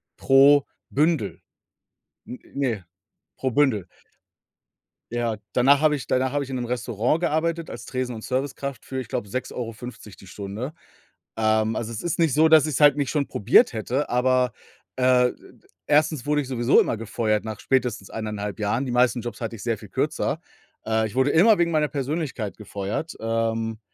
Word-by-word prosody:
pro 140 +1 +5 0.2
Bündel. 145 - 0 0.9
N 125 - -7 0.2
ne, 120 -9 -2 0.5
pro 130 - -1
Bündel. 125 -8 +2 1.2
Ja, 120 -2 -1 0.2
danach 135 +3 +4
habe 155 -1 +4
ich 140 - -6
danach 130 0 +1
habe 145 -1 0
ich 135 - -8
in - - -3
'nem 125 -1 -2
Restaurant 120 +3 -1
gearbeitet 165 0 -1
als - - -8
Tresen 125 -1 -3
und 110 -1 -8
Servicekraft 135 0 -3
für, 130 - -4
ich 130 - -6
glaube, 100 - -3
6,50€ 115 -1 -6
die 95 - -15
Stunde. 105 - -6 0.6
Ähm, 110 0 +2
also, 115 0 -3
es 110 - -6
ist 175 -1 -2
nicht 165 -5 +3
so, 155 +2 +5
dass 155 -1 +6
ich's 150 - -1
halt 145 -1 +7
nicht 140 -2 0
schon 145 -2 0
probiert 105 +3 +4
hätte, 125 +6 -2
aber, 125 0 +2 0.4
äh, 125 -1 +4
d - - -25 0.2
d - - -27 0.2
1. 150 -3 +2
wurde 150 0 +2
ich 135 - -7
sowieso 125 0 +3
immer - - -1
gefeuert 110 -1 -1
nach 110 -2 -5
spätestens 125 -7 -1
1,5 105 -1 -4
Jahren. 105 +6 0
Die 125 - -3
meisten 125 0 +2
Jobs 120 +1 -7
hatte 115 0 -4
ich - - -10
sehr 115 -2 -1
viel - - -12
kürzer. - - -1 0.5
Äh, 110 0 +1
ich 110 - -11
wurde 130 +2 +3
immer 205 +6 +6
wegen 170 -1 +2
meiner 155 -1 +2
Persönlichkeit 140 -6 -3
gefeuert, 105 - -5
ähm, 115 0 -1
125 Hz, 180 wpm, -24 LUFS, 110-145 Hz, 1.2 s, halt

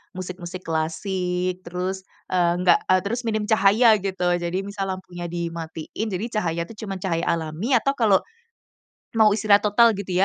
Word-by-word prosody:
musik-musik 180 0 -7
klasik, 180 +3 -2
terus, 185 +2 -3 0.3
eee, 175 -2 +3
nggak 175 -2 +5
eee, 185 0 +4
terus 235 +4 -2
minim 215 -1 0
cahaya 215 +2 +5
gitu. 185 -2 -1
Jadi 175 +1 -2
misal 200 -1 -4
lampunya 175 -2 -8
dimatiin 170 +3 -5
jadi 200 +2 -3
cahaya 170 -2 -1
tuh 200 - -11
cuman 195 -1 -4
cahaya 165 -3 -1
alami, 170 - 0
atau 275 +4 +2
kalau 205 -4 +5 1.0
mau 215 -2 +5
istirahat 205 -1 +4
total 220 +1 +4
gitu, 195 -2 -6
185 Hz, 150 wpm, -23 LUFS, 175-205 Hz, 1.0 s, nggak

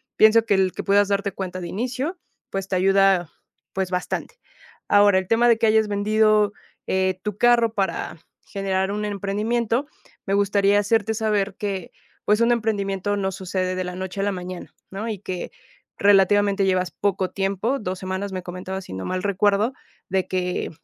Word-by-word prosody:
pienso 220 +1 +6
que 210 - +2
el 190 -1 +2
que - - -5
puedas 200 0 +3
darte 200 0 0
cuenta 185 -1 -5
de 175 - -5
inicio, 255 - -3 0.3
pues, 195 -1 -3
te 195 - -2
ayuda, 195 -2 +3 0.4
pues, 190 -1 -2
bastante. 180 - -3 0.5
Ahora 205 -1 +5
el 185 - -6
tema 230 +3 +3
de 230 - +5
que 225 - +1
hayas 220 0 +3
vendido, 210 0 +2 0.3
eh, 190 -1 0
tu 210 -2 -4
carro 235 -1 +4
para 195 -4 -2 0.3
generar 195 -1 -1
un 210 +1 -2
emprendimiento. 215 +5 -1 0.4
Me 195 - -1
gustaría 200 0 +3
hacerte 220 +1 +1
saber 205 -3 0
que 195 -4 -4 0.3
pues 210 +1 +3
un 235 +1 +4
emprendimiento 205 -3 -1
no 190 -1 -1
sucede 185 0 -3
de 185 - -2
la 180 0 -5
noche 190 +1 -4
a - - 0
la 205 - +1
mañana, 180 -1 -7 0.2
¿no?, 200 +4 -5
y 210 -3 -4
que 185 -2 -5 0.5
relativamente 200 0 +4
llevas 185 -1 +1
poco 190 +1 -1
tiempo. 200 +7 -1
Dos 185 -3 -4
semanas 190 +1 -4
me 185 -1 -4
comentabas, 185 +1 -6
si - - -9
no 95 0 -5
mal 185 0 -3
recuerdo, 205 +4 +2 0.4
de 190 0 0
que, 180 -1 -2
200 Hz, 175 wpm, -23 LUFS, 190-210 Hz, 0.5 s, pienso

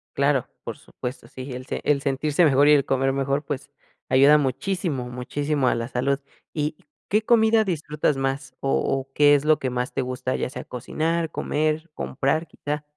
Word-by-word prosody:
Claro. 140 -2 +2 0.2
Por - - -6
supuesto. 125 +1 -8
Sí, 130 +1 -8
el 125 +1 -7
se - - -4
el 145 -2 +2
sentirse 145 +4 +2
mejor 145 0 +5
y 150 - +8
el 140 -1 +4
comer 135 0 +1
mejor, 140 +2 0
pues, 140 0 -5 0.4
ayuda 140 +3 +6
muchísimo, 145 -1 -1
muchísimo 140 +3 -1
a - - +3
la 115 0 -3
salud. 135 +3 0 0.3
¿Y 150 0 -2 0.3
qué 210 +2 +3
comida 220 -1 +4
disfrutas 150 -5 0
más? 135 0 -3
O 135 - -1
o, 135 0 -2
¿qué 145 0 +6
es 140 - +1
lo 155 0 +3
que 130 - -1
más 125 0 -2
te - - 0
gusta, 130 0 -2
ya - - -2
sea - - -7
cocinar, 160 +6 -2
comer, 155 +2 -1
comprar 155 +5 -1
quizá? 150 0 -4
140 Hz, 185 wpm, -24 LUFS, 130-150 Hz, 0.4 s, y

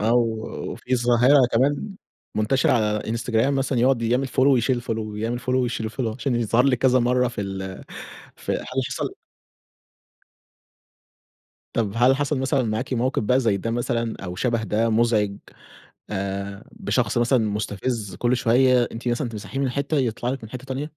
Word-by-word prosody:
أو 115 +3 +3 0.5
وفي 130 0 -2
ظاهرة 125 +3 +5
كمان 145 - +1 0.4
منتشرة 110 +5 +2
على 115 -4 +3 0.2
إنستجرام 115 +3 +1
مثلًا 135 -2 0
يقعد 125 0 +3
يعمل 125 +4 +1
Follow - - -14
ويشيل 125 -2 +3
الFollow 110 -3 -4
يعمل 115 +3 -2
Follow 125 - -17
ويشيل 120 -3 -1
الFollow 115 -3 -3
عشان 125 +1 -1
يظهر 120 +1 +2
لِك 130 -3 +3
كذا 130 0 +4
مَرّة 125 +1 +2
في 115 - -6
ال 95 -1 -5 0.5
في - - -4
هل - - -3 0.2
حصل - - -4 2.6
طب 105 -4 0
هل 125 +3 +5
حصل 145 0 -1
مثلًا 130 0 +1
معاكِ 115 +4 -2
موقف 125 +2 0
بقى 125 +5 +3
زي 110 -5 +2
ده 115 +4 -3
مثلًا 115 -1 -1
أو 90 -1 -5
شبه 115 +1 0
ده 110 +1 +1
مزعج، 110 -3 +2 0.7
آآ، 100 0 -4
بشخص - - -1
مثلًا 120 +2 +3
مستفز، 105 0 -3
كل 120 +1 +1
شوية 125 +1 +4
أنتِ 115 +2 -6
مثلًا 120 +1 0
تمسحيه 110 +5 -6
من 135 - +1
حتة 140 +4 -1
يطلع 120 -2 -1
لِك 130 -3 -4
من 110 - -9
حتة 130 +2 -8
تانية؟ 135 +2 -3
120 Hz, 165 wpm, -23 LUFS, 110-130 Hz, 2.6 s, ظاهرة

